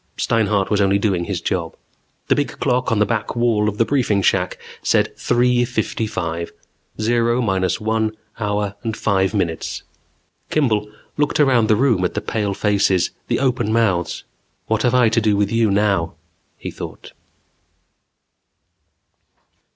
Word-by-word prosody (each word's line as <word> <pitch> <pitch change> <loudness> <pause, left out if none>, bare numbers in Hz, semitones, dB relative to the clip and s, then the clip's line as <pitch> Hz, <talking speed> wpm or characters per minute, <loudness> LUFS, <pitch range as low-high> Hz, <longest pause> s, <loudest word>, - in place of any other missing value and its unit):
Steinhart 105 -4 +1
was 105 -1 +2
only 100 0 +3
doing 95 -4 0
his 95 -2 -3
job. 85 -2 -2 0.5
The - - +4
big 145 -4 -2
clock 125 -2 +1
on 115 - +2
the 105 - +3
back 115 0 -2
wall 115 -3 +2
of 105 - -7
the 115 - +3
briefing 115 -8 +1
shack 90 -1 +1 0.2
said - - +1
three 125 0 +2
fifty 115 -2 -2
five. 85 -3 -4 0.5
Zero 120 +2 +1
minus 95 -5 0
one 110 0 -1 0.2
hour 105 -2 -1
and 110 0 -3
five 95 0 +1
minutes. 85 -5 -2 0.7
Kimball 110 -8 +1 0.3
looked 150 0 +1
around 130 -6 +4
the 110 - +4
room 115 -5 +2
at 90 - -1
the - - +1
pale 105 -3 -2
faces, 100 -3 +2 0.2
the - - +1
open 125 -5 0
mouths. 100 -7 0 0.4
What 110 -1 0
have 120 0 +2
I 125 -2 +5
to 115 +1 +1
do 105 -2 +2
with 100 0 +1
you 115 -1 +2
now, 100 -4 +1 0.4
he - - -6
thought? - - -9
105 Hz, 150 wpm, -20 LUFS, 100-120 Hz, 0.7 s, I